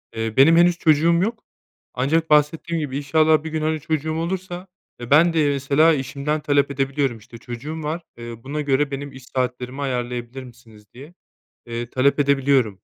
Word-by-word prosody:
Eee, 115 0 -4
benim 160 +5 +6
henüz 175 0 +4
çocuğum 160 +1 +3
yok. 230 +2 -3 0.5
Ancak 160 +6 0
bahsettiğim 155 +3 +2
gibi 140 -3 -3
inşallah 155 +2 +2
bir 160 - -5
gün, 155 0 -2
hani, 155 0 -1
çocuğum 155 +1 -2
olursa 180 +2 -4 0.3
e, 120 - -8
ben 165 +3 +5
de 150 -3 +2
mesela 140 +4 +3
işimden 140 +3 -2
talep 145 -1 +1
edebiliyorum. 135 -2 -1
İşte 115 +2 -14
çocuğum 145 +7 -7
var, 160 +3 -3 0.2
eee, 120 0 -8
buna 150 +3 -4
göre 145 0 0
benim 140 0 -5
iş 130 -1 -13
saatlerimi 125 +1 -3
ayarlayabilir 125 -1 -4
misiniz 110 -3 -16
diye, 140 +7 -13 0.5
eee, 120 0 -5
talep 140 +3 +2
edebiliyorum. 135 -5 +2
140 Hz, 170 wpm, -22 LUFS, 130-160 Hz, 0.5 s, benim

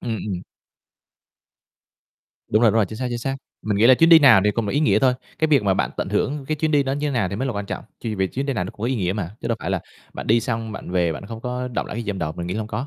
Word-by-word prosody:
Ừm, 115 -2 -3
ừm. 95 -3 -5 2.0
Đúng 110 +3 +2
rồi, 115 - +6
đúng - - -3
rồi, 105 -4 +3
chính 110 - -8
xác, 130 - -2
chính 120 -1 -3
xác. 135 +3 -3 0.3
Mình 105 -2 -1
nghĩ 110 +3 +5
là 130 - +8
chuyến 165 +5 +4
đi 165 - +10
nào 130 -9 +7
thì 105 - +4
cũng 110 +1 -2
là - - -2
ý 145 - +1
nghĩa 150 - +4
thôi, 130 -2 +3 0.2
cái 160 - +2
việc 140 -7 +4
mà 95 -2 +2
bạn - - 0
tận - - -2
hưởng 140 0 -1
cái 155 - 0
chuyến 155 +1 0
đi 145 -2 +4
đó 135 0 -2
như 145 +1 -1
thế - - -1
nào 110 -7 +1
thì 100 - -4
mới 130 +4 -2
là 125 - -1
quan 100 -1 -4
trọng. - - -5 0.2
Ch - - -8
vì 95 0 +1
chuyến 135 +8 -4
đi 140 - 0
nào 90 -7 -1
nó - - -6
cũng - - -20
có 115 - 0
ý 130 - 0
nghĩa 90 -3 0
mà, 95 -4 -4
chứ 115 - -4
đâu 115 - 0
phải 90 - -3
là 95 -3 0 0.3
bạn - - -6
đi 115 +2 +4
xong 115 -2 -3
bạn 95 - -7
về, 85 -3 +1
bạn 100 - -8
không 115 0 -7
có 125 +1 -3
đọng 120 - -3
lại - - -6
cái 120 - -3
gì 105 - -8
trong 100 -2 -2
đầu. 75 0 -2
Mình 85 +1 -6
nghĩ 90 - -3
là - - -2
hông 105 - -4
có. 130 +5 -3
115 Hz, 345 wpm, -22 LUFS, 100-135 Hz, 2.0 s, đi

